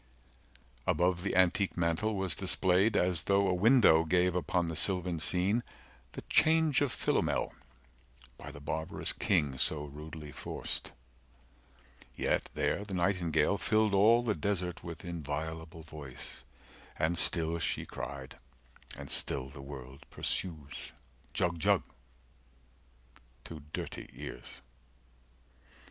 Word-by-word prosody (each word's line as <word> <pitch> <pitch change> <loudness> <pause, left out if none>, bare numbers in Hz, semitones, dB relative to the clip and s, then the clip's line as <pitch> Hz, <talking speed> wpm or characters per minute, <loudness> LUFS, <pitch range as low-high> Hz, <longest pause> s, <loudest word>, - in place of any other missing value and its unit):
Above 90 0 +2
the 100 - -2
antique 95 +1 +2
mantel 85 +6 0
was 95 -4 +1
displayed 95 +8 +3
As 90 -3 +2
though 100 0 +3
a 95 - +2
window 100 -4 +5
gave 90 +2 +2
upon 90 0 0
the 80 - -4
sylvan 90 -1 +3
scene 90 +9 +1 0.5
The - - -7
change 160 -2 +3
of 145 -4 +1
Philomel, - - 0 0.8
by - - -10
the 70 - -10
barbarous 80 +2 -2
king 70 -3 +1
So 75 -1 0
rudely 75 +1 -9
forced; - - -5 1.2
yet - - 0
there 100 - 0
the 100 -2 -5
nightingale 85 -3 +1
100 100 - +1
Filled 110 -1 +3
all 110 +5 +5
the 115 -3 +1
desert 90 -4 -2
with 85 -1 -8
inviolable 80 0 -5
voice 75 -4 -7 0.5
And 80 +2 +1
still 80 +1 +2
she - - -1
cried, 65 0 -7 0.6
and - - -8
still 65 -1 -1
the 70 - -10
world 70 -1 -10
pursues, 75 -6 -2 0.4
"Jug 85 -2 0
Jug" - - +3 1.6
to 80 -2 -9
dirty - - -5
ears. - - -8
85 Hz, 120 wpm, -31 LUFS, 80-95 Hz, 1.6 s, window